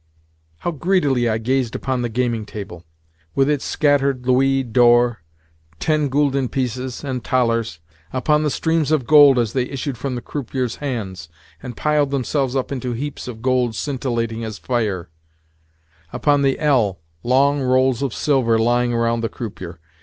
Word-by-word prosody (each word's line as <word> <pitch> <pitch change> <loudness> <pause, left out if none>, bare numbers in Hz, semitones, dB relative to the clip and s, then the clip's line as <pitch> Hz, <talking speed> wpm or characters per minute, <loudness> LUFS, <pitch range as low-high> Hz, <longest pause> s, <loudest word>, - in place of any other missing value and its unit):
How 175 - -1
greedily 145 -8 +1
I 110 - +1
gazed 125 +1 -1
upon 130 -2 -2
the 120 - -2
gaming 120 -1 -1
table, 100 -5 -8 0.5
with 135 0 +3
its 145 -2 0
scattered 140 -3 +1
louis 135 +1 +3
d'or, 120 0 +4 0.6
ten 150 - 0
gülden 140 -2 +1
pieces, 130 -1 -3
and 130 -4 -4
thalers; 115 - 0 0.3
upon 150 +4 +1
the 150 - +1
streams 160 +1 0
of 155 -5 +1
gold 145 -2 +7
as 115 -3 0
they 130 - +1
issued 135 -1 -5
from 135 -2 -3
the 120 - -4
croupier's 130 -3 -4
hands, 100 - -5 0.3
and 125 -3 -8
piled 150 -2 +1
themselves 135 0 -1
up 135 0 -2
into 125 -2 -3
heaps 145 +4 -5
of 115 -2 -8
gold 125 -3 +1
scintillating 115 -4 -2
as 110 -2 -5
fire; 95 -1 -2 1.0
upon 145 -1 +2
the 135 -1 +2
ell—long 125 - +1
rolls 130 -1 +2
of 140 -3 -1
silver 125 -4 +1
lying 120 +2 +2
around 115 0 0
the 115 - -1
croupier. 95 -7 -8
125 Hz, 155 wpm, -20 LUFS, 115-140 Hz, 1.0 s, gold